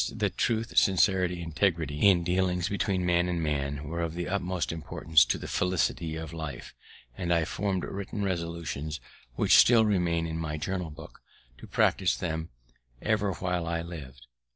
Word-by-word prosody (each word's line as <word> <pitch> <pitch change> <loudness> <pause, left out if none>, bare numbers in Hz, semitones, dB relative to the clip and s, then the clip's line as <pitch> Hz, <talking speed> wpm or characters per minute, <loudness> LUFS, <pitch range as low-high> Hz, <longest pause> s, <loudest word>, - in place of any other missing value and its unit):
I - - +2
grew - - -2
convinc'd - - -9
that - - 0
truth, 115 -1 0
sincerity 95 -1 +3
and 80 - -6
integrity 80 -2 +1
in 90 -3 +3
dealings 90 +1 0
between 95 -2 0
man 90 0 +2
and 90 -1 -1
man 70 -2 -2
were 85 +2 -3
of 85 -1 -3
the 85 0 -3
utmost 90 -2 -1
importance 80 -1 +2
to - - 0
the - - -7
felicity 85 -3 0
of 80 0 -6
life; 80 -6 -6 0.4
and 85 +3 -3
I 85 -2 +3
form'd 95 +1 -2
written 100 +1 -5
resolutions, 85 -4 -3 0.4
which - - +4
still 115 -2 +7
remain 85 -5 +1
in 80 0 -4
my 75 -1 -3
journal 90 +1 -3
book, 75 - -12 0.4
to - - -11
practice - - +2
them 80 -2 -3 0.5
ever 105 - 0
while 90 -1 -2
I 85 0 -1
lived. 70 -7 -9
85 Hz, 175 wpm, -28 LUFS, 80-95 Hz, 0.5 s, still